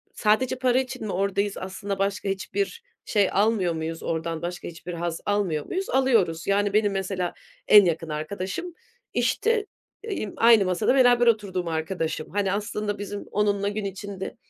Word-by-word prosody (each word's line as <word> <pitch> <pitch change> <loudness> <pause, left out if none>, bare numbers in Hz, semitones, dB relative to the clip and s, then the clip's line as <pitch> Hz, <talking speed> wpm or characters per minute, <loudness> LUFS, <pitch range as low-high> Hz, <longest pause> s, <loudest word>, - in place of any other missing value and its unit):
sadece 220 +4 +2
para 255 0 +3
için 255 -4 -4
mi - - -3
oradayız? 200 +2 0
Aslında 195 +1 -5
başka 200 0 -1
hiçbir 400 - -3 0.2
şey 205 -3 +2
almıyor 200 -3 +2
muyuz 160 0 -4
oradan? 165 0 -2
Başka 175 +1 -5
hiçbir 170 +1 -8
haz 170 -1 -3
almıyor 195 -7 0
muyuz? 380 +1 -3
Alıyoruz. 220 -12 +2
Yani, 200 0 +2
benim 210 -1 +3
mesela 190 -2 -2 0.3
en 205 -2 +9
yakın 165 -1 -1
arkadaşım, 190 - -4 0.4
işte, 450 -2 +1 0.4
eee, 425 -4 -3
emm, 205 - -6
aynı 225 -3 +6
masada 185 +7 +2
beraber 245 -2 +5
oturduğum 195 -6 +1
arkadaşım. 160 -1 -2
Hani, 200 -1 0
aslında 205 0 -2
bizim 205 0 -5
onunla 205 -1 +1
gün 205 0 -3
içinde 195 0 -6
200 Hz, 155 wpm, -25 LUFS, 180-215 Hz, 0.4 s, en